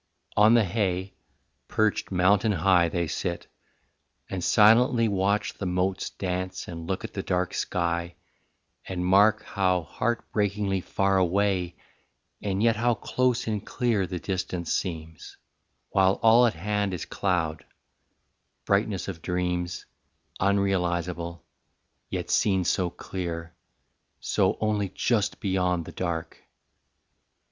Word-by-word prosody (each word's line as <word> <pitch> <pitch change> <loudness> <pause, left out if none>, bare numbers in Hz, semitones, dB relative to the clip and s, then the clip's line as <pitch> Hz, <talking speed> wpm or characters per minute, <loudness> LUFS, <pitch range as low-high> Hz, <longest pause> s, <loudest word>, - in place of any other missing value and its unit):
On 105 +3 +6
the 115 - +5
hay, 95 -1 -1 0.5
Perched 110 -1 0
mountain 100 +4 +3
high 90 -1 +3
they 85 0 -1
sit, 85 +2 -3 0.9
and 95 -2 -3
silently 115 +4 +5
Watch 100 +1 0
the 100 - -5
motes 90 +1 -1
dance 90 0 -4
and 85 -1 -7
look 95 +3 -2
at 110 - -7
the 95 - -3
dark 90 -1 -1
sky 85 -1 -2 0.7
And 90 -1 -3
mark 105 +4 +4
how 90 -3 0
heartbreakingly 105 -3 -1
far 95 +1 +1
away 95 -1 +1 0.7
And 100 0 -1
yet 115 -1 +3
how 120 +1 +2
close 125 +3 0
and 105 -3 -2
clear 115 -6 0
the 90 - -4
distance 90 -2 -3
seems, 80 -3 -5 0.5
While 95 -1 +4
all 115 +2 +7
at 115 - -2
hand 100 +2 -1
is 85 - -5
cloud 90 -5 -1 1.0
brightness 100 -1 0
of 85 -4 -6
dreams 90 0 -2 0.5
Unrealisable, 90 -3 0 0.7
yet - - -3
seen 95 -3 +2
so 90 +1 +1
clear, 85 -2 -6 0.7
So - - +1
only 105 -2 0
just 105 +2 0
beyond 90 -4 0
the - - -8
dark. 85 -2 -4
95 Hz, 120 wpm, -26 LUFS, 90-105 Hz, 1.0 s, all